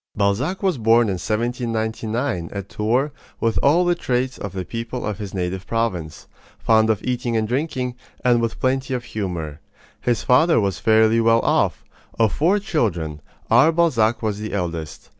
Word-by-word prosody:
Balzac 125 Hz, -, 0 dB
was 185 Hz, -9 st, +1 dB
born 115 Hz, 0 st, +4 dB
in 95 Hz, -2 st, -2 dB
1799, 115 Hz, -3 st, -2 dB
at 100 Hz, -1 st, -6 dB
Tours, 125 Hz, +7 st, 0 dB, 0.3 s
with 115 Hz, -1 st, +1 dB
all 165 Hz, +6 st, +4 dB
the 175 Hz, -, +3 dB
traits 130 Hz, -5 st, -2 dB
of 100 Hz, -, -5 dB
the 95 Hz, -1 st, -4 dB
people 115 Hz, +3 st, -5 dB
of 105 Hz, 0 st, -3 dB
his 100 Hz, -3 st, -5 dB
native 95 Hz, 0 st, -3 dB
province 100 Hz, -9 st, -2 dB, 0.3 s
fond 110 Hz, 0 st, +3 dB
of 110 Hz, -2 st, 0 dB
eating 125 Hz, -2 st, -1 dB
and 110 Hz, -1 st, 0 dB
drinking, 125 Hz, 0 st, -2 dB, 0.3 s
and 120 Hz, -1 st, +4 dB
with 115 Hz, -1 st, -2 dB
plenty 130 Hz, 0 st, 0 dB
of 125 Hz, -, -4 dB
humor. 85 Hz, -10 st, -5 dB, 0.4 s
His 120 Hz, -2 st, 0 dB
father 160 Hz, +5 st, +4 dB
was 100 Hz, -5 st, -1 dB
fairly 110 Hz, +1 st, +4 dB
well 115 Hz, 0 st, +4 dB
off. -, -, +1 dB, 0.3 s
Of 110 Hz, -2 st, +2 dB
four 175 Hz, +7 st, +2 dB
children, 90 Hz, -, -2 dB, 0.3 s
our 160 Hz, -, +6 dB
Balzac 120 Hz, -9 st, +2 dB
was 105 Hz, -2 st, -1 dB
the 110 Hz, -1 st, -5 dB
eldest. 85 Hz, -5 st, -4 dB
115 Hz, 165 wpm, -21 LUFS, 100-125 Hz, 0.4 s, our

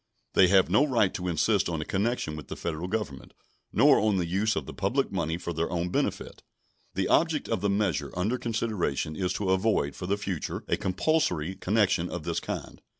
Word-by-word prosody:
They 95 Hz, -, +6 dB
have 95 Hz, 0 st, +5 dB
no 105 Hz, -, +4 dB
right 120 Hz, -9 st, +2 dB
to 90 Hz, -, -4 dB
insist 95 Hz, +4 st, +2 dB
on 80 Hz, -2 st, -2 dB
a 75 Hz, -, -3 dB
connection 100 Hz, -5 st, -1 dB
with 75 Hz, -, -8 dB
the -, -, -6 dB
Federal 85 Hz, +1 st, -4 dB
Government, 95 Hz, -10 st, -4 dB, 0.4 s
nor -, -, +5 dB
on 105 Hz, -2 st, +2 dB
the 90 Hz, -, 0 dB
use 100 Hz, +5 st, 0 dB
of 80 Hz, -, -2 dB
the -, -, -8 dB
public 130 Hz, +8 st, 0 dB
money 85 Hz, -4 st, -1 dB
for 85 Hz, -1 st, -5 dB
their 80 Hz, +1 st, -1 dB
own 90 Hz, 0 st, -1 dB
benefit. -, -, -2 dB, 0.5 s
The 95 Hz, 0 st, 0 dB
object 160 Hz, -3 st, +2 dB
of 115 Hz, -5 st, -1 dB
the 100 Hz, -, +1 dB
measure 100 Hz, -5 st, 0 dB
under 110 Hz, +8 st, 0 dB
consideration 110 Hz, -, -1 dB
is 90 Hz, +2 st, -1 dB
to 100 Hz, -1 st, -1 dB
avoid 95 Hz, -, +1 dB
for 90 Hz, -, -6 dB
the 100 Hz, +2 st, +1 dB
future 95 Hz, -5 st, -4 dB
a -, -, +2 dB
compulsory 95 Hz, -, 0 dB
connection 95 Hz, -3 st, +1 dB
of -, -, -5 dB
this -, -, -1 dB
kind. -, -, -6 dB
95 Hz, 205 wpm, -28 LUFS, 85-105 Hz, 0.5 s, They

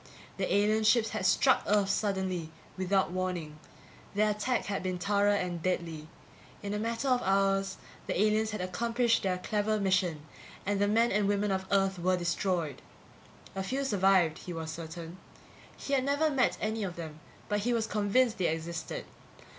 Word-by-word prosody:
The -, -, -1 dB
alien 215 Hz, +2 st, +3 dB
ships 220 Hz, +1 st, +4 dB
had 205 Hz, -4 st, -1 dB
struck 260 Hz, +7 st, +4 dB
Earth 205 Hz, -1 st, +3 dB
suddenly, 190 Hz, -6 st, -1 dB, 0.3 s
without 190 Hz, 0 st, +1 dB
warning. 175 Hz, -5 st, -3 dB, 0.6 s
Their 210 Hz, +1 st, +3 dB
attack 215 Hz, +4 st, -1 dB
had 200 Hz, -1 st, -2 dB
been 185 Hz, -1 st, -2 dB
thorough 205 Hz, +2 st, +2 dB
and 180 Hz, -3 st, -2 dB
deadly. 165 Hz, -3 st, -2 dB, 0.6 s
In 200 Hz, 0 st, -3 dB
a 210 Hz, -, -1 dB
matter 230 Hz, +4 st, -2 dB
of 250 Hz, -1 st, +3 dB
hours 195 Hz, 0 st, +1 dB, 0.3 s
the -, -, -1 dB
aliens 215 Hz, +1 st, +2 dB
had 215 Hz, -3 st, -4 dB
accomplished 230 Hz, +6 st, +1 dB
their 185 Hz, -2 st, 0 dB
clever 210 Hz, +3 st, 0 dB
mission 185 Hz, -6 st, +1 dB, 0.4 s
and 200 Hz, 0 st, 0 dB
the 205 Hz, -, +3 dB
men 230 Hz, +3 st, +3 dB
and 205 Hz, 0 st, +2 dB
women 205 Hz, 0 st, +1 dB
of 190 Hz, 0 st, -2 dB
Earth 195 Hz, -2 st, +2 dB
were 185 Hz, +1 st, +2 dB
destroyed. 170 Hz, -3 st, -1 dB, 0.7 s
A 195 Hz, -, -3 dB
few 260 Hz, +9 st, -2 dB
survived, 190 Hz, -7 st, +3 dB
he 180 Hz, -, -7 dB
was 160 Hz, -1 st, -5 dB
certain. 165 Hz, +1 st, -8 dB, 0.6 s
He 280 Hz, -, -4 dB
had 265 Hz, -2 st, +3 dB
never 285 Hz, +3 st, +1 dB
met 265 Hz, -3 st, +2 dB
any 220 Hz, 0 st, -2 dB
of 180 Hz, -3 st, -4 dB
them, 160 Hz, -2 st, -7 dB, 0.3 s
but 205 Hz, 0 st, 0 dB
he 235 Hz, +4 st, 0 dB
was 230 Hz, -2 st, +1 dB
convinced 215 Hz, +2 st, +1 dB
they 180 Hz, -, +2 dB
existed. 165 Hz, +1 st, -4 dB
195 Hz, 170 wpm, -30 LUFS, 180-215 Hz, 0.7 s, ships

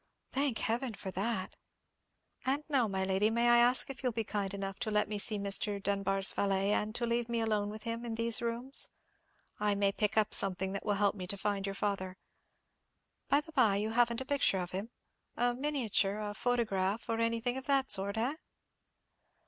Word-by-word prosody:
"Thank 270 Hz, -3 st, 0 dB
Heaven 235 Hz, 0 st, -1 dB
for 190 Hz, -, -6 dB
that!" 195 Hz, 0 st, -3 dB, 0.9 s
"And 275 Hz, +3 st, 0 dB
now, 270 Hz, -6 st, +2 dB
my 190 Hz, -2 st, -2 dB
lady, 190 Hz, +3 st, +2 dB
may 235 Hz, +1 st, +2 dB
I 240 Hz, 0 st, +7 dB
ask 245 Hz, +2 st, +4 dB
if 260 Hz, -, -10 dB
you'll 255 Hz, -2 st, 0 dB
be 225 Hz, 0 st, -2 dB
kind 200 Hz, -2 st, -3 dB
enough 195 Hz, -1 st, -5 dB
to 240 Hz, -2 st, -2 dB
let 210 Hz, 0 st, +1 dB
me 210 Hz, -1 st, -3 dB
see 210 Hz, +1 st, -1 dB
Mr. 200 Hz, +1 st, +1 dB
Dunbar's 195 Hz, 0 st, +2 dB
valet, 195 Hz, 0 st, +1 dB
and 210 Hz, +1 st, 0 dB
to 240 Hz, -, -1 dB
leave 235 Hz, 0 st, -1 dB
me 235 Hz, -1 st, 0 dB
alone 215 Hz, -2 st, 0 dB
with 215 Hz, +1 st, -8 dB
him 230 Hz, 0 st, -4 dB
in 230 Hz, -2 st, -4 dB
these 230 Hz, 0 st, +2 dB
rooms? 235 Hz, +3 st, -1 dB, 0.7 s
I 210 Hz, -1 st, +1 dB
may 200 Hz, 0 st, +2 dB
pick 210 Hz, +1 st, -1 dB
up 215 Hz, -1 st, +3 dB
something 190 Hz, 0 st, +3 dB
that 200 Hz, -, -3 dB
will 205 Hz, -, +2 dB
help 200 Hz, 0 st, +2 dB
me 185 Hz, -3 st, -7 dB
to 200 Hz, -, -2 dB
find 200 Hz, 0 st, -2 dB
your 195 Hz, -, -4 dB
father. 190 Hz, -2 st, -2 dB, 1.1 s
By 285 Hz, -, +5 dB
the 320 Hz, -, -14 dB
bye, 240 Hz, -9 st, +3 dB
you 210 Hz, +2 st, -1 dB
haven't 235 Hz, +1 st, +2 dB
a -, -, -5 dB
picture 280 Hz, -8 st, +2 dB
of 180 Hz, -1 st, -4 dB
him—a 235 Hz, +4 st, -4 dB
miniature, 240 Hz, -7 st, 0 dB
a 210 Hz, -1 st, -4 dB
photograph, 220 Hz, -3 st, -1 dB
or 230 Hz, -1 st, -1 dB
anything 230 Hz, +2 st, 0 dB
of 265 Hz, 0 st, -6 dB
that 275 Hz, -1 st, +2 dB
sort, 200 Hz, +2 st, +2 dB
eh?" 255 Hz, +7 st, -1 dB
215 Hz, 195 wpm, -32 LUFS, 200-240 Hz, 1.1 s, I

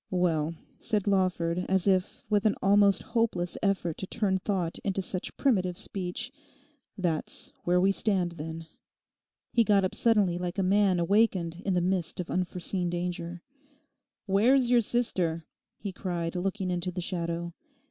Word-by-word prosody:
'Well,' 165 Hz, -3 st, +1 dB, 0.2 s
said 210 Hz, -3 st, 0 dB
Lawford, 180 Hz, -3 st, +1 dB
as 190 Hz, -1 st, +2 dB
if 190 Hz, -2 st, +1 dB
with 210 Hz, 0 st, +2 dB
an 210 Hz, -, +1 dB
almost 200 Hz, 0 st, +4 dB
hopeless 225 Hz, -7 st, 0 dB
effort 190 Hz, -5 st, 0 dB
to 190 Hz, -, -4 dB
turn 195 Hz, -3 st, 0 dB
thought 185 Hz, -4 st, -2 dB
into 195 Hz, -1 st, -1 dB
such 185 Hz, -1 st, -4 dB
primitive 185 Hz, -10 st, +1 dB
speech, 185 Hz, +6 st, -4 dB, 0.7 s
'that's 170 Hz, -5 st, -2 dB
where 180 Hz, +1 st, +3 dB
we 190 Hz, +2 st, +4 dB
stand, 195 Hz, -4 st, +1 dB
then.' 160 Hz, 0 st, -7 dB, 0.9 s
He 235 Hz, -, +5 dB
got 205 Hz, -3 st, +3 dB
up 185 Hz, -, 0 dB
suddenly 205 Hz, -7 st, +2 dB
like 180 Hz, +1 st, -3 dB
a 195 Hz, -, +1 dB
man 195 Hz, -1 st, +3 dB
awakened 180 Hz, -2 st, +2 dB
in 195 Hz, -, +1 dB
the 180 Hz, -, +2 dB
midst 180 Hz, -1 st, -1 dB
of 180 Hz, -, -4 dB
unforeseen 180 Hz, 0 st, -1 dB
danger, 175 Hz, 0 st, -4 dB, 0.8 s
'Where 215 Hz, +6 st, +4 dB
is 250 Hz, -3 st, +2 dB
your 245 Hz, -1 st, +6 dB
sister?' 180 Hz, -9 st, 0 dB, 0.3 s
he 200 Hz, -2 st, -5 dB
cried, 175 Hz, -2 st, -3 dB
looking 190 Hz, +1 st, -1 dB
into 180 Hz, +1 st, -2 dB
the 180 Hz, -, -5 dB
shadow. 170 Hz, -1 st, -3 dB
185 Hz, 155 wpm, -28 LUFS, 175-200 Hz, 0.9 s, your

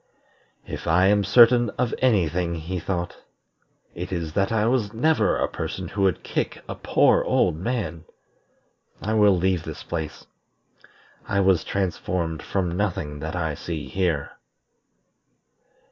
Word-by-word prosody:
"If -, -, -7 dB
I 90 Hz, +3 st, +4 dB
am 105 Hz, 0 st, +3 dB
certain 120 Hz, +3 st, +6 dB
of 125 Hz, -2 st, 0 dB
any 110 Hz, -10 st, +3 dB
thing," 85 Hz, +1 st, -2 dB
he 85 Hz, +3 st, -4 dB
thought, 85 Hz, 0 st, -3 dB, 0.8 s
"it 90 Hz, +3 st, -6 dB
is 85 Hz, -4 st, -3 dB
that 95 Hz, +4 st, +1 dB
I 110 Hz, -1 st, +2 dB
was 115 Hz, -3 st, +1 dB
never 155 Hz, +8 st, +2 dB
a -, -, +1 dB
person 95 Hz, -3 st, -5 dB
who 100 Hz, -, -3 dB
would 95 Hz, -2 st, +1 dB
kick -, -, -3 dB
a -, -, -4 dB
poor -, -, +3 dB
old -, -, +2 dB
man. 90 Hz, -3 st, -3 dB, 0.9 s
I 110 Hz, -, -2 dB
will 105 Hz, -3 st, +5 dB
leave 90 Hz, -1 st, +1 dB
this -, -, -7 dB
place. 80 Hz, -3 st, -5 dB, 1.0 s
I 100 Hz, -, 0 dB
was 95 Hz, -4 st, +3 dB
transformed 90 Hz, -4 st, -2 dB
from 90 Hz, -3 st, -2 dB
nothing 90 Hz, -7 st, -2 dB
that 80 Hz, +4 st, -5 dB
I 80 Hz, -3 st, -1 dB
see 75 Hz, -2 st, -5 dB
here." 85 Hz, -2 st, -1 dB
95 Hz, 145 wpm, -24 LUFS, 85-105 Hz, 1.0 s, certain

